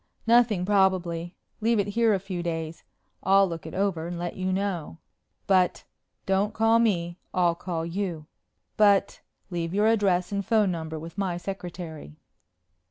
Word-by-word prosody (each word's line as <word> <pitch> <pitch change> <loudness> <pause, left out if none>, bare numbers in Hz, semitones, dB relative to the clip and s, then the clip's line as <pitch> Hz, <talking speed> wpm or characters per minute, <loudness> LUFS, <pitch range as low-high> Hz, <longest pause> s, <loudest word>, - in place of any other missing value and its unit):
"Nothing 225 -5 +4
probably. 180 -3 +1 0.2
Leave 230 +1 +2
it 205 0 0
here 230 +2 +3
a - - -1
few 185 -2 -5
days. 165 -1 -4 0.4
I'll 195 0 +5
look 165 -2 -6
it 160 - -8
over 185 -4 0
and 175 0 -5
let 175 0 -4
you 185 0 -2
know." 185 -5 -2 0.5
"But 185 -2 +3 0.2
" - - -53
"And - - -46
don't 195 +2 +1
call 225 +1 +4
me 175 -6 0 0.2
I'll 175 -2 +3
call 170 -1 -4
you." 170 -3 -3 0.5
"But 200 -2 +3
" - - -46
"Leave 170 0 -3
your 210 +1 +3
address 200 -5 +2
and 200 0 -1
phone 210 -1 +2
number 160 -2 -4
with 165 +4 -8
my 185 -3 -1
secretary." 175 - -7
185 Hz, 165 wpm, -26 LUFS, 170-200 Hz, 0.5 s, I'll